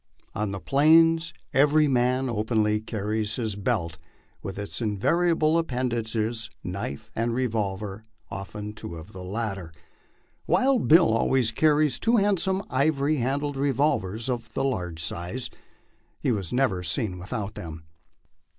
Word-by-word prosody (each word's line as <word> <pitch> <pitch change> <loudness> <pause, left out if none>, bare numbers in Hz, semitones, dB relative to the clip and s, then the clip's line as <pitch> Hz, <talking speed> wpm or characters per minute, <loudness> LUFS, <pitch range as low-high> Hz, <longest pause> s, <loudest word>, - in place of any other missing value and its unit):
On 105 0 -2
the 100 0 -4
Plains 165 - +4 0.2
every 150 +2 +4
man 130 0 +2
openly 110 -2 +1
carries 110 -1 -2
his 110 -5 -2
belt 95 -7 -2 0.4
with 95 - -6
its 105 +3 -4
invariable 160 - +2
appendages, 115 -5 -1
knife 90 -6 -5
and 115 +1 0
revolver, 105 -4 -2 0.3
often 105 +2 -6
two 95 -5 -8
of 80 +5 -10
the 95 -1 -8
latter. 95 -3 -4 0.8
Wild 260 -2 +3
Bill 165 -7 +6
always 125 0 +2
carried 150 0 +3
two 230 - +2
handsome 195 -1 +1
ivory 140 +2 +2
handled 140 +3 -1
revolvers 125 -6 0
of 120 -4 -3
the 135 - 0
large 90 -11 -2
size; 90 +10 -3 0.7
he - - 0
was 100 -7 -2
never 125 -8 +1
seen 90 +2 -1
without 105 +2 -4
them. 80 -4 -8
115 Hz, 130 wpm, -26 LUFS, 100-140 Hz, 0.8 s, Bill